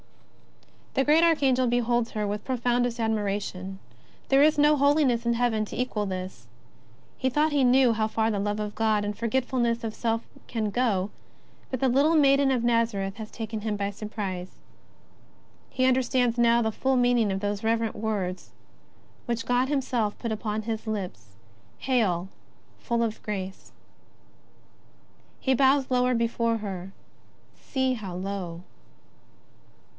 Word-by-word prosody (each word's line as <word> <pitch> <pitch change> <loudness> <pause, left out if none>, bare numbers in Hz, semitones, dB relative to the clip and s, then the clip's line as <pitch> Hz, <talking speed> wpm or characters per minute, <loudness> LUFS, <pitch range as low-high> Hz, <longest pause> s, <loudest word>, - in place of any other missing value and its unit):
The 270 - +3
great 310 +3 +5
Archangel 270 -6 +3
beholds 240 -1 +1
her 215 -1 -2
with 205 +1 -3
profoundest 245 -1 0
admiration. 200 -3 -2 0.5
There 270 0 +5
is 305 +1 +5
no 295 +1 +5
holiness 280 -5 +2
in 235 - +2
heaven 230 -2 +1
to - - -8
equal 215 -5 -1
this. 185 0 -6 0.7
He 260 - 0
thought 300 +4 +2
he 280 -2 +3
knew 250 -1 +5
how 215 -1 0
far 220 0 0
the 205 - -1
love 205 +1 -1
of 210 -1 -3
God 215 -2 +1
and 205 0 -4
forgetfulness 235 0 0
of 220 -1 -3
self 230 0 -1 0.2
can 220 -3 -2
go, 210 -5 0 0.6
but 260 - -3
the 265 - +2
little 280 +6 +3
Maiden 275 -2 +4
of 250 -3 0
i^azareth 230 -5 +1
has 220 0 -7
taken 220 -1 -5
him 210 -1 -2
by 200 0 -2
surprise. 200 -3 -5 1.1
He 255 - 0
under 260 0 +4
stands 245 -1 +1
now 235 0 +4
the 220 - 0
full 265 +3 +1
meaning 245 -4 +3
of 190 - -1
those 205 +1 -3
reverent 225 0 0
words 205 -4 -3 0.8
which 235 -1 -2
God 245 +2 +1
Himself 250 -7 -1
put 230 - -4
upon 215 0 -3
his 225 0 -4
lips: 180 - -5 0.4
^' - - -29
Hail, 205 -9 +1 0.5
full 235 -1 0
of 220 -1 -3
grace! 190 -2 -5 0.9
" - - -33
He 265 - +1
bows 270 0 +3
lower 250 0 +2
before 230 0 0
her 195 -3 -6 0.3
— - - -33
see 260 -1 +1
how 200 -7 -6
low 180 -2 -5
230 Hz, 155 wpm, -26 LUFS, 210-255 Hz, 1.1 s, great